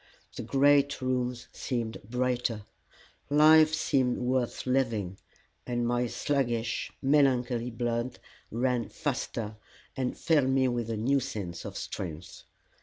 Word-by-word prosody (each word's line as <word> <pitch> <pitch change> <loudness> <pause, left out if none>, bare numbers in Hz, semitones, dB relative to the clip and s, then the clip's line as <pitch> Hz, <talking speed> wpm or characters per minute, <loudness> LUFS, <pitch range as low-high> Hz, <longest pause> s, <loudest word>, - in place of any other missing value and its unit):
The - - -4
great 140 +1 +3
rooms 125 -2 -2
seemed 115 -4 -3
brighter, 125 -1 -1 0.7
life 155 +1 +7
seemed 130 -5 +1
worth 125 -1 -1
living; 115 -8 0 0.5
my 120 0 0
sluggish, 120 -4 -1
melancholy 125 -4 +2
blood 120 +1 -2 0.3
ran 120 -1 0
faster, 105 -1 -3 0.4
and 130 -2 -2
filled 150 -5 +2
me 130 0 +3
with 120 -2 -2
a 115 - -2
new 135 +6 +2
sense 105 -10 -5
of - - -6
strength. 85 -1 -6
125 Hz, 110 wpm, -29 LUFS, 115-135 Hz, 0.7 s, life